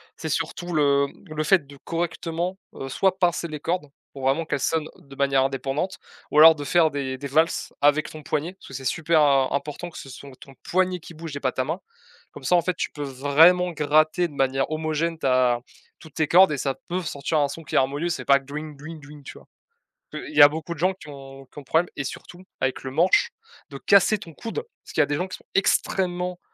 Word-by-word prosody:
c'est - - -6
surtout 175 0 -3
le 140 -2 +3
mmh, 155 - -14
le 155 - 0
fait 155 -4 +3
de 140 - -13
correctement, 170 +2 -3 0.2
heu, 135 - -6
soit 190 +7 0
pincer 175 -2 +1
les 150 -1 -6
cordes- 165 -1 -2 0.3
pour 135 -1 -9
vraiment 140 +5 +1
qu'elles 140 - -2
sonnent 160 -1 0
de 140 -1 -15
manière 135 -1 +2
indépendante- 135 +6 -2 0.3
ou 150 - 0
alors 160 +1 +10
de 145 - -6
faire 160 +1 +3
des 135 -2 -3
des 140 - -6
valses 160 +4 +1
avec 145 +1 +3
ton 155 -1 -10
poignet 155 +4 -2
parce 190 - -17
que - - -11
c'est 135 0 -6
super 160 +3 +2
im 135 -3 +4
important 150 +5 -3
que 170 - -12
ce 135 - -9
sont 140 +1 -11
ton 135 - -14
poignet 185 -1 0
qui 170 - -12
bouge 160 -2 -8
et 140 - -5
pas 130 - +1
ta 130 - -2
main. 165 +6 -3 0.5
Comme - - -11
ça 180 - +4
en 175 - +4
fait 180 +1 -2
tu - - -2
peux 145 - -6
vraiment 150 +7 +4
gratter 155 +3 +2
de - - -14
manière 135 0 0
homogène 155 +1 -1
ta 125 -3 +2 0.4
toutes 160 -4 -15
tes 155 - +1
cordes 185 +2 +6
et 140 - -2
ça 135 0 -2
peut 180 +2 -1
sortir 150 0 -1
un 145 - +3
son 165 - -8
qui 150 - -6
est - - +5
harmonieux. 145 +6 +1
C'est 175 - -3
pas 140 0 +5
que 135 - -20
dring 150 +1 -7
dring 155 +2 -9
dring, 145 0 -13
tu - - -10
vois? - - -17 0.6
Que - - -6
il 310 - -10
y - - +9
a 145 - +10
beaucoup 160 +2 -5
de 150 - -13
gens 185 +2 +2
qui 185 - -15
ont 135 -1 -11
qui - - -24
ont - - -9
le - - -19
problème, 165 +5 +2
et 140 - -3
surtout 175 +6 -9 0.2
avec 130 0 -1
le 130 - -5
manche 170 +7 +3 0.4
de 140 - -8
casser 200 +7 +4
ton 165 -4 -11
coude. 335 - -6 0.2
Parce - - -12
qu'il - - +3
y - - +6
a - - +1
des 145 - -1
gens 180 +5 -2
qui 185 - -7
sont - - -24
extrêmement 180 -2 0
155 Hz, 250 wpm, -24 LUFS, 140-175 Hz, 0.6 s, alors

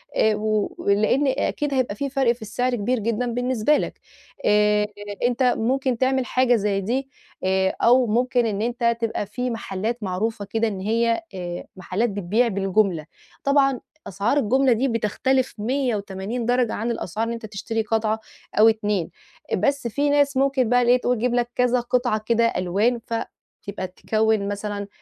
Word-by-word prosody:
آآ، 220 -1 +3
و 215 -1 -1
ولإن 215 +7 +2
أكيد 280 +1 -1
هيبقى 255 -6 0
في 275 +5 -3
فرق 265 -3 +2
في 235 - -6
السعر 245 +4 -1
كبير 240 +2 0
جدًا 230 +3 -1
بالنسبة 250 +3 +2
لك - - -4 0.5
آآ، 210 0 +3 0.4
أنت 245 +1 +1
ممكن 255 +1 0
تعمل 260 0 +1
حاجة 255 -1 +3
زي 200 -2 0
دي 260 +7 -2 0.3
آآ، 190 0 +1
أو 245 +1 +5
ممكن 245 +2 +1
إن 210 -2 -1
أنت 235 0 0
تبقى 225 -2 -1
في 250 +5 -3
محلات 225 +1 -3
معروفة 205 +3 -2
كده 225 +3 0
إن 200 -3 -4
هي 230 - +1
آآ، 175 -1 -5
محلات 195 +5 -1
بتبيع 205 +5 +1
بالجملة 195 -4 +1 0.4
طبعًا 275 -2 +3 0.3
أسعار 200 +9 0
الجملة 260 +1 +3
دي 255 +5 +1
بتختلف 255 +3 0
180 220 -2 -2
درجة 245 -1 +1
عن 230 +3 -2
الأسعار 220 -1 -3
اللي 230 - -3
أنت 230 - -8
تشتري 220 +2 -3
قطعة 220 0 0 0.4
أو 220 - +8
2 210 -5 -1 0.5
بس 280 -3 0
في 285 +5 0
ناس 285 -1 +2
ممكن 270 -3 +2
بقى 245 0 +4
اللي 245 0 +4
هي 250 - +5
تقول 250 0 0
تجيب 240 +2 0
لك 245 0 +1
كذا 250 0 +2
قطعة 245 -2 0
كده 235 +1 +3
ألوان 205 +7 +1
فتبقى 205 -4 -6
تكّون 215 +2 0
مثلًا 205 0 -4
230 Hz, 165 wpm, -23 LUFS, 210-250 Hz, 0.5 s, أو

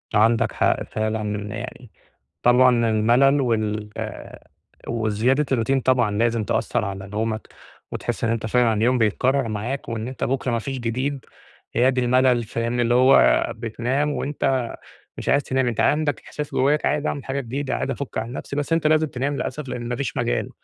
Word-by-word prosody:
عندك 110 +2 +3
حق، - - +1
فعلًا 110 -1 -2 0.2
يعني. 120 0 -8 0.5
طبعًا 120 -1 +4
الملل 120 +6 +4
وال 110 -4 -1 1.0
وزيادة 115 +5 +1
الروتين 130 +2 +1
طبعًا 125 -4 +2
لازم 115 -1 +1
تأثّر - - 0
على 95 0 -5
نومك 110 +1 -3 0.4
وتحس - - -3
إن 115 - +1
أنت 115 -1 -1
فعلًا 120 +1 +3
اليوم 120 +4 +2
بيتكرر 125 +4 +1
معاك 115 +6 -4
وإن 115 0 -3
أنت 130 - -4
بكره 130 0 -1
ما 115 - +1
فيش 135 +4 -4
جديد، 130 +4 -2 0.5
يا 125 +3 +4
دي 130 -1 +1
الملل، 125 -1 +3
فاهمني؟ 115 +2 -1
اللي 120 0 +2
هو 130 +2 +5
بتنام 120 +6 -1
وأنت 135 -4 -1 0.5
مش - - -5
عايز 140 +1 +3
تنام. 130 -1 0
أنت 120 -2 -1
عندك 150 -1 +1
إحساس 150 -1 -5
جواك 145 +3 +2
عايز 150 +1 +1
أعمل 140 - -3
حاجة 135 +1 -2
جديدة، 135 +1 -3
عايز - - -2
أفك 135 -3 -5
عن 115 +2 -3
نفسي. 140 +1 -6
بس 145 +2 -2
أنت 165 -1 +2
لازم 155 0 +3
تنام 140 0 -2
للأسف 140 +1 -4
لأن 120 -1 -5
ما 120 - -2
فيش 135 -2 -3
مجال. - - -1
125 Hz, 170 wpm, -23 LUFS, 115-135 Hz, 1.0 s, هو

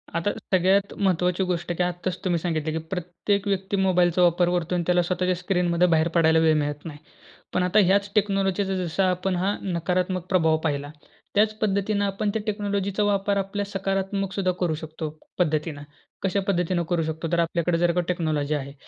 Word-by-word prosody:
आता 170 +5 +1 0.2
सगळ्यात 190 +2 +3
महत्त्वाची 180 -1 +1
गोष्ट 175 -2 -2
की 180 - +2
आत्ताच 180 +1 -2
तुम्ही 175 -2 +1
सांगितलं 160 -2 -2
की 160 - -2
प्रत्येक 190 +3 -2
व्यक्ती 195 0 -1
मोबाईलचा 180 -2 +3
वापर 175 0 +4
करतो 175 0 -1
आणि 175 - 0
त्याला 180 0 +4
स्वतःच्या 180 +1 0
स्क्रीनमधून 180 -1 +1
बाहेर 160 -1 +3
पडायला 160 -1 +5
वेळ 160 -1 +4
मिळत 145 0 -2
नाही. 155 -3 -7 0.6
पण 185 - +2
आता 180 +4 +3
ह्याच 200 +2 +2
टेक्नॉलॉजीचा 195 -1 +1
जसा 185 +1 0
आपण 185 +1 -1
हा 190 +3 0
नकारात्मक 180 0 -1
प्रभाव 160 -4 +3
पाहिला, 145 -2 -1 0.5
त्याच 215 +1 +4
पद्धतीनं 205 0 +1
आपण 200 +1 -1
त्या 220 - -1
टेक्नॉलॉजीचा 200 -1 -1
वापर 200 0 +1
आपल्या 200 +1 -2
सकारात्मक 195 0 -2
सुद्धा 185 -2 +1
करू 175 -3 +1
शकतो 155 0 -6 0.3
पद्धतीनं. 155 -3 0 0.4
कशा 195 +1 +1
पद्धतीनं 180 -2 +1
करू 175 -2 +1
शकतो? 160 +1 -3
तर 170 - +2
आपल्याकडे 170 0 +1
जर 175 0 +3
का 180 +1 +1
टेक्नॉलॉजी 155 -4 -1
आहे. 140 -1 -5
180 Hz, 175 wpm, -25 LUFS, 170-195 Hz, 0.6 s, पडायला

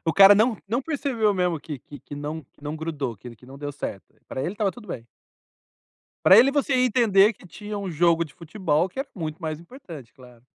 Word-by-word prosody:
O 165 - +1
cara 195 +1 +9
não 220 +2 +3
não 240 +5 0
percebeu 260 -9 0
mesmo 180 -5 0
que 150 -3 -7
que 145 +4 -13
que 145 - -10
não 150 +2 -5
que 140 - -28
não 150 +1 -4
grudou, 145 -7 -4
que 115 +5 -11
ele 115 - -12
que 125 - -19
não 135 +1 -12
deu 145 0 -5
certo, 100 -8 -7
pra 130 - -4
ele 180 - -2
estava 205 -2 -1
tudo 235 -4 -14
bem. 120 -7 -6 1.2
Para 195 +4 +9
ele 260 +3 +6
você 280 -1 0
ia 255 0 +3
entender 220 -3 +4
que 185 - -18
tinha 210 +4 -7
um 200 -1 -4
jogo 170 0 +2
de 145 - -16
futebol 170 -1 -1
que - - -19
era 270 +1 -2
muito 160 -3 -5
mais 155 -2 -4
importante, 170 - -12
claro. 125 -2 -18
170 Hz, 230 wpm, -24 LUFS, 145-210 Hz, 1.2 s, cara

